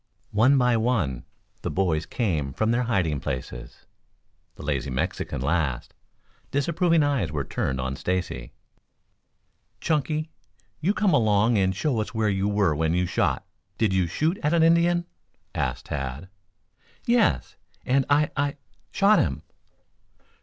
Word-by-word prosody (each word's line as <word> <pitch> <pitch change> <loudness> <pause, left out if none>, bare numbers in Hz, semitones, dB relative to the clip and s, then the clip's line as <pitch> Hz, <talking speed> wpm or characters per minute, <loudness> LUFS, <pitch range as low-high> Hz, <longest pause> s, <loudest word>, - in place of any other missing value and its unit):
One 120 +7 +4
by 125 -2 +3
one 105 - 0 0.4
the - - -3
boys 85 -5 0
came 80 - -1
from 110 - +1
their 120 +1 +2
hiding 90 - 0
places, 65 -3 -6 0.7
the - - -11
lazy 70 -2 -1
Mexican 65 -1 -2
last. 75 -4 -1 0.6
Disapproving 165 +3 +2
eyes 135 - 0
were 75 -2 -2
turned 65 0 -2
on 65 +1 -2
Stacy. 90 -7 -3 1.3
"Chunky, 155 0 -1 0.5
you 190 +7 +1
come 205 -3 +2
along 110 0 +3
and 95 -1 +1
show 120 +1 0
us 110 - -6
where 110 -1 +1
you 95 0 0
were 100 -5 +2
when 80 +2 +1
you 90 0 +2
shot - - 0 0.3
did 110 -4 +1
you 95 -2 +2
shoot 155 - 0
at 150 +3 +2
an 165 - +4
Indian?" 170 +1 +3 0.5
asked 65 -2 -2
Tad. 70 +5 -5 0.8
"Yes, 235 -3 +2 0.3
and 135 +2 +3
I 145 +1 +3
I 140 - +2
I 145 - -7 0.3
shot 205 +2 +4
him." - - -1
105 Hz, 140 wpm, -25 LUFS, -, 1.3 s, One